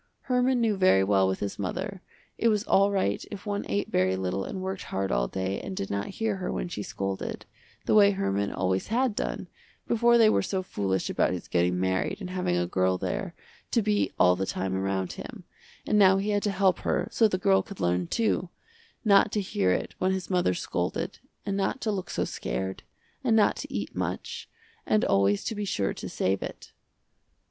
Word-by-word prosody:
Herman 250 -1 +2
knew 220 -4 +1
very 185 - +5
well 95 -1 +3
with 95 0 -2
his 100 0 -4
mother, 185 - -4 0.3
it 230 - +1
was 210 -2 +2
all 200 -3 +4
right 190 - 0
if 205 0 -8
one 205 -1 -2
ate 100 +1 -1
very 95 +1 +2
little 95 +1 -2
and 190 - -5
worked 190 0 -4
hard 95 0 -2
all - - +1
day 95 +4 -3
and 95 - -6
did 95 - -3
not 100 0 -2
hear 220 -3 0
her 185 - -3
when - - -2
she 135 - -4
scolded, 95 -1 -4 0.4
the - - +2
way 205 -1 +7
Herman 100 - -1
always 95 +1 -1
had 245 +1 +1
done - - -3 0.4
before 235 +1 +4
they 225 -2 +6
were 215 - +3
so 190 0 -2
foolish 95 - -1
about - - +1
his 90 - -6
getting 90 +1 +1
married 95 - 0
and 185 -3 -6
having 180 - 0
a 90 - +1
girl 95 +1 +1
there 185 - -3 0.3
to 230 - +2
be 210 0 +1
all 90 0 +5
the 95 +1 -2
time 95 0 -2
around 95 -1 -1
him, - - -9 0.4
and 210 - +2
now 190 -1 +6
he 200 +2 -1
had 205 0 +1
to 205 - 0
help 190 -2 +2
her - - 0
so 225 - +4
the 185 - -1
girl 195 +1 +3
could 200 -3 -11
learn 90 0 +1
too, 215 - 0 0.6
not 200 0 +5
to 210 - +1
hear 100 - 0
it 90 - -1
when 185 +1 +2
his 190 0 -4
mother 180 - +2
scolded, - - -3 0.3
and 200 - -1
not 200 +6 -1
to 220 - 0
look 190 -3 -4
so - - -1
scared, 95 +11 -4 0.4
and 235 -4 +3
not 215 -2 +4
to - - -7
eat - - -4
much, - - -4 0.3
and 215 - +2
always 100 +1 +2
to - - -2
be 210 -1 -3
sure 100 - -1
to - - -7
save 95 +1 0
it. - - -7
185 Hz, 210 wpm, -27 LUFS, -, 0.6 s, way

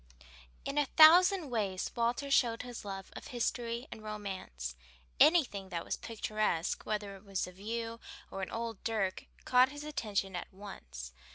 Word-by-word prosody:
In 285 +1 0
a 290 - +2
thousand 340 +1 +7
ways 200 -5 -1
Walter 240 +4 0
showed 235 -4 +3
his 245 -1 -7
love 195 -2 -6
of - - -8
history 240 0 -2
and 220 - -8
romance. 190 - -5 0.4
Anything 245 - +4
that 170 -2 -3
was - - -1
picturesque, 215 -6 -1
whether 205 -2 -2
it 195 - -14
was 195 -2 -2
a 180 - -9
view 230 +4 -4 0.3
or 195 - -4
an 190 - -3
old 230 -2 -4
dirk, 215 -4 -1 0.2
caught 255 +1 +6
his 290 +1 -8
attention 205 -10 -2
at 175 - -5
once. 60 - -9
215 Hz, 160 wpm, -33 LUFS, 195-245 Hz, 0.4 s, thousand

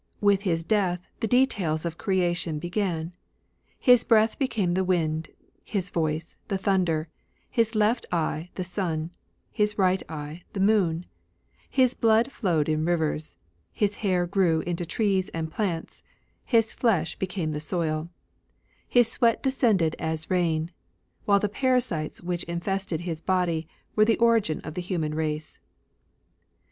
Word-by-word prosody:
With 200 -1 +3
his 165 -5 0
death 180 -3 0
the 225 - 0
details 205 -11 +1
of 165 -1 -4
creation 175 -4 0
began. 175 0 -2 0.6
His 245 -3 +5
breath 220 -1 +3
became 215 -10 0
the 190 +1 +1
wind; 160 -3 0 0.3
his 195 -3 -3
voice, 160 -1 -2
the 195 - -1
thunder; 180 -5 +1 0.4
his 230 -2 +1
left 215 +3 +2
eye, 165 0 -1
the 185 - -2
sun; 170 -3 -3 0.4
his 210 -1 0
right 190 -1 +3
eye, 155 +1 -6
the 200 - -4
moon; 190 -5 +2 0.6
his 255 -2 +3
blood 230 +2 +3
flowed 165 - 0
in 155 0 +1
rivers; 160 -2 -1 0.4
his 210 -1 0
hair 185 -4 +1
grew 175 -3 +2
into 175 0 -3
trees 195 0 +1
and 160 -1 -3
plants; 175 -6 -3 0.4
his 225 -3 +2
flesh 190 -10 +1
became 180 -4 -2
the 150 - -3
soil; 155 0 -2 0.8
his 245 -2 +4
sweat 230 0 +1
descended 220 - +2
as 160 +1 -3
rain; 170 -2 +1 0.5
while 200 -1 +4
the 210 - +1
parasites 240 - 0
which 175 0 -2
infested 175 0 -2
his 165 -2 -4
body 175 -4 0 0.3
were 215 - +5
the 225 0 +3
origin 230 -9 +2
of 155 - -7
the 180 - -3
human 170 -4 -2
race. 155 -1 -3
180 Hz, 140 wpm, -26 LUFS, 160-210 Hz, 0.8 s, His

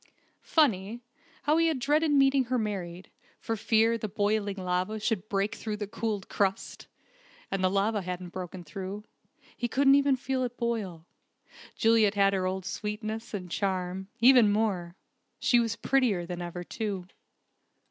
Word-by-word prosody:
Funny, 230 - +1 0.4
how 300 +2 +3
he 330 0 +4
had 320 -4 +1
dreaded 295 +5 +2
meeting 275 -2 +4
her 255 +1 0
married, 190 -5 -4 0.3
for 225 - -2
fear 225 +1 +2
the 215 - -3
boiling 205 0 0
lava 185 +3 -1
should 215 -1 -2
break 200 +1 0
through 215 -2 -4
the 210 - -3
cooled 210 -1 -3
crust! 195 -1 -2 0.6
And 195 -1 -1
the 185 - +4
lava 200 +2 +1
hadn't 180 0 -5
broken 180 0 -7
through. 190 +5 -6 0.5
He 240 - -2
couldn't 270 +3 +4
even 280 -1 +4
feel 260 0 -2
it 245 -1 -4
boil. 210 -9 -3 0.7
Juliet 225 -2 +3
had 200 0 +4
her 185 -1 0
old 190 0 -3
sweetness, 215 +2 -4
and 180 -3 -6
charm 190 -1 -2
even 240 -3 +7
more. 195 -5 -1 0.4
She 240 - +3
was 230 -1 0
prettier 230 -10 +1
than 175 0 -5
ever, 175 0 -5
too. 200 -2 -4
210 Hz, 155 wpm, -28 LUFS, 190-235 Hz, 0.7 s, even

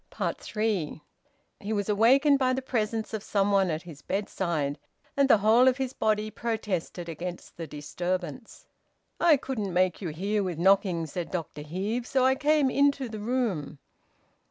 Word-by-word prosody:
THREE. 210 -9 -2 0.6
He 210 +2 -3
was 205 -2 -1
awakened 265 +7 +4
by 255 -1 +2
the 260 - -1
presence 225 -3 -2
of 220 - -2
some 200 -1 +1
one 195 -2 +3
at 155 0 -2
his 160 -5 -11
bedside, 170 -7 -2 0.4
and 280 -1 +3
the - - +7
whole 220 +5 +5
of 255 -1 +4
his 265 -1 -3
body 215 0 0
protested 205 -7 -3
against 175 +2 -7
the 165 -1 -6
disturbance. 175 +4 -5 0.5
"I 335 -4 +5
couldn't 220 -8 -4
make 180 +1 +1
you 180 - -3
hear 200 +7 -1
with 180 -4 -3
knocking," 185 -2 +3
said 165 +3 -5
Dr 165 -4 -5
Heve, 200 +10 -3
"so 260 -1 +2
I 260 - +5
came 290 0 +2
into 280 -2 +2
the 215 -1 -6
room." 215 - -2
205 Hz, 160 wpm, -27 LUFS, 175-245 Hz, 0.6 s, the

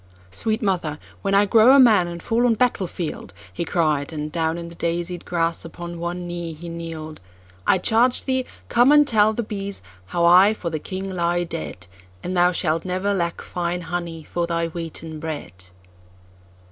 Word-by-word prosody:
"Sweet 220 - -1
mother, 175 -7 0 0.2
when 195 0 +1
I 200 +1 +5
grow 225 +6 +6
a - - +7
man 215 -9 +6
and 170 -1 -7
fall 235 +2 +2
on 230 - +3
battle 225 -5 +1
field,"He 170 0 -6
cried, 155 -4 0
and 150 -1 -4
down 160 0 0
in 170 0 -6
the 170 - -10
daisied 170 +1 -2
grass 165 -1 0
upon 170 +1 -8
one 175 +1 -4
knee 175 -1 -5
he 170 +2 -9
kneel'd,"I 155 - -4
charge 235 +6 +3
thee, 260 -1 0 0.2
come 245 +4 +4
and 295 -1 +6
tell 215 -4 +4
the 235 - -2
bees 200 -2 -5 0.2
how 170 - +1
I 185 +5 +7
for 170 -5 -4
the 155 - -2
king 190 +4 -5
lie 175 -1 0
dead; 90 - -6 0.4
And 185 - -3
thou 175 0 +4
shalt 165 -2 0
never 185 +2 -1
lack 170 -3 -2
fine 175 0 -3
honey 170 -1 -4
for 170 +2 -2
thy 170 -1 -1
wheaten 165 -1 -6
bread!" 150 - -6
175 Hz, 175 wpm, -22 LUFS, 165-195 Hz, 0.4 s, a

